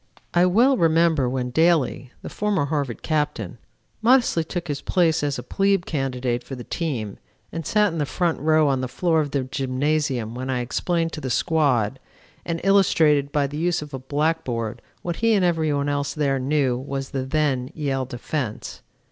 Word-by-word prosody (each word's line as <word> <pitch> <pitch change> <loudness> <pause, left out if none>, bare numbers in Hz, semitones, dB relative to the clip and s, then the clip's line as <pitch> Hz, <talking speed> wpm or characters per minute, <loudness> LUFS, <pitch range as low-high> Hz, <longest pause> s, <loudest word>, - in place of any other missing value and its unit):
I 175 +1 +4
well 245 +8 +4
remember 165 - +3
when 125 -1 -2
Daly, 155 -5 +2
the - - -6
former 205 -8 0
Harvard 140 -5 -3
Captain, 145 - -2 0.4
modestly 235 -8 +4
took 175 +2 -5
his 145 -2 -3
place 165 -3 +2
as 145 -2 -1
a 125 - -6
plebe 195 +5 +1
candidate 125 -4 -2
for 135 - -7
the 125 - -8
team 120 - -3 0.3
and 165 -2 -5
sat 210 -4 +2
in 165 - -3
the 145 - 0
front 170 +4 0
row 155 0 +3
on 135 -2 +1
the 130 - -2
floor 160 +5 +1
of 145 - -3
the 140 -1 -1
gymnasium 130 -2 -1
when 130 +2 -5
I 125 -1 0
explained 165 +6 -1
to 155 - -5
the 130 - -3
squad, 130 -5 +1 0.5
and 165 -1 -2
illustrated 160 -7 +3
by 145 -1 +1
the 145 +2 -5
use 175 -1 0
of 150 -1 -12
a 135 - -4
blackboard, 130 -5 -2 0.2
what 175 -1 -3
he 230 0 +3
and 195 -4 +3
every 160 -3 +1
one 140 0 0
else 145 +1 -1
there 140 -3 +1
knew 130 -2 +1
was 135 0 -5
the 135 -1 -2
then 130 -2 0
Yale 135 -4 -1
defense. 125 -1 -5
145 Hz, 185 wpm, -23 LUFS, 130-165 Hz, 0.5 s, I